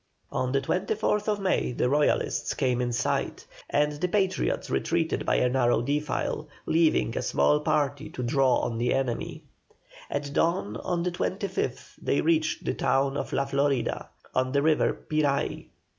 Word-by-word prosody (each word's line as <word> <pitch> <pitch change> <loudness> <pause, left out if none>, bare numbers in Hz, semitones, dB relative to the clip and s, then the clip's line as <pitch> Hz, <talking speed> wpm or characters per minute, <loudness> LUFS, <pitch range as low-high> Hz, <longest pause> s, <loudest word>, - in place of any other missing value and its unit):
On 130 -1 -1
the 135 0 +2
24th 210 +6 0
May 190 -9 0
the 125 - +1
Royalists 145 +3 +1
came 125 -1 +1
in 120 -1 -1
sight, 120 - -1 0.2
and 150 +1 +2
the 155 +5 -1
Patriots 190 0 0
retreated 165 -1 0
by - - +3
a 125 - +3
narrow 120 -2 +2
defile, 150 +3 -1 0.2
leaving 160 -7 +2
a - - 0
small 150 - +3
party 150 -1 0
to 125 - -5
draw 130 +1 +3
on 115 -1 -2
the 125 +1 +1
enemy. 130 -3 -2 0.7
At 145 0 -3
dawn 165 - +1
on 170 -1 -2
the 180 - 0
25th 180 -7 -3
they 140 - +1
reached 160 -1 +1
the - - 0
town 135 +1 +1
of - - -3
LA 140 - +1
FLORIDA, 140 -3 0 0.2
on 130 0 0
the 140 0 +2
river 155 -1 +3 0.2
Piray. 150 -3 0
145 Hz, 160 wpm, -27 LUFS, 130-165 Hz, 0.7 s, by